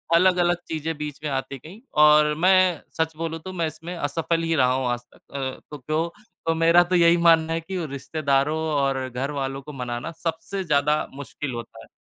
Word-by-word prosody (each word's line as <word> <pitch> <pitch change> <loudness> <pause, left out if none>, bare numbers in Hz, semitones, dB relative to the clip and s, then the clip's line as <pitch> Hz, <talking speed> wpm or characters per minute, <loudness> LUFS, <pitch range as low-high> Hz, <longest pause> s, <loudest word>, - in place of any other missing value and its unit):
अलग-अलग 175 0 +4
चीज़ें 160 0 -3
बीच 150 -1 -6
में 150 - -2
आती 135 0 -3
गई 190 +8 -11 0.2
और 150 0 +6
मैं 185 0 +4 0.2
सच 160 -1 0
बोलूँ 165 0 -3
तो 185 +4 -8
मैं 170 -3 -1
इसमें 165 +3 -7
असफल 165 +1 -1
ही 165 0 +1
रहा 130 -3 +3
हूँ 130 -1 -1
आज 120 0 -1
तक - - -22
अ, 130 -1 -3
तो 150 - -6
तो 155 +5 -2 0.3
तो, 165 - +3
मेरा 165 +2 +5
तो 180 +1 -1
यही 170 0 +5
मानना 165 -1 +4
है 165 - -1
कि 185 +3 -5
उ 170 - -2
रिश्तेदारों 140 +1 0 0.2
और 135 -2 0
घरवालों 135 +1 -3
को 150 +2 -10
मनाना 125 +3 -4
सबसे 175 +4 -3
ज़्यादा 150 -2 +2
मुश्किल 140 -1 -6
होता 115 -1 -8
है, - - -16
155 Hz, 200 wpm, -24 LUFS, 140-170 Hz, 0.3 s, और